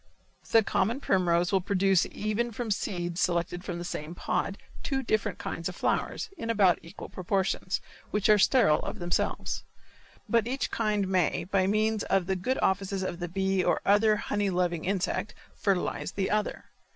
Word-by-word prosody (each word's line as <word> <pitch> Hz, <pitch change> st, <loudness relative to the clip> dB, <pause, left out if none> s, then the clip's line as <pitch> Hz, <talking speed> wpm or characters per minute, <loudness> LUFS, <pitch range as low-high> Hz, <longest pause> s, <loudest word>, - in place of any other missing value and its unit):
The 225 Hz, -1 st, +5 dB
common 220 Hz, +5 st, 0 dB
primrose 175 Hz, -6 st, +2 dB
will 195 Hz, -2 st, +3 dB
produce 195 Hz, -1 st, +2 dB
even 215 Hz, +3 st, -1 dB
from 230 Hz, 0 st, -4 dB
seeds 175 Hz, -4 st, -2 dB
selected 175 Hz, 0 st, 0 dB
from 175 Hz, -3 st, -4 dB
the 175 Hz, -, -5 dB
same 160 Hz, 0 st, -5 dB
pod, 195 Hz, +2 st, -1 dB, 0.2 s
two 270 Hz, -1 st, -1 dB
different 215 Hz, -4 st, 0 dB
kinds 165 Hz, +2 st, -4 dB
of 180 Hz, -, -8 dB
flowers, 425 Hz, -, -1 dB
in 230 Hz, -, -4 dB
about 200 Hz, -6 st, +4 dB
equal 170 Hz, +4 st, -9 dB
proportions, 185 Hz, 0 st, -1 dB, 0.3 s
which 210 Hz, -1 st, +1 dB
are 210 Hz, -1 st, +6 dB
sterile 205 Hz, -, +5 dB
of -, -, -5 dB
themselves. 175 Hz, 0 st, -1 dB, 0.6 s
But 230 Hz, -2 st, +2 dB
each 260 Hz, 0 st, -2 dB
kind 210 Hz, -3 st, 0 dB
may, 185 Hz, -4 st, +1 dB
by 190 Hz, +1 st, +1 dB
means 215 Hz, +1 st, +1 dB
of 195 Hz, -2 st, +2 dB
the 190 Hz, +1 st, 0 dB
good 250 Hz, +9 st, -1 dB
offices 195 Hz, 0 st, 0 dB
of 175 Hz, -2 st, -4 dB
the 175 Hz, -1 st, -4 dB
bee 190 Hz, +1 st, +1 dB
or -, -, +2 dB
other 210 Hz, +2 st, +5 dB
honey 205 Hz, -1 st, -1 dB
loving 175 Hz, -2 st, 0 dB
insect, 195 Hz, +2 st, -1 dB, 0.2 s
fertilize 190 Hz, -1 st, -1 dB
the 195 Hz, -1 st, -1 dB
other. 210 Hz, 0 st, -1 dB
195 Hz, 170 wpm, -28 LUFS, 180-210 Hz, 0.6 s, are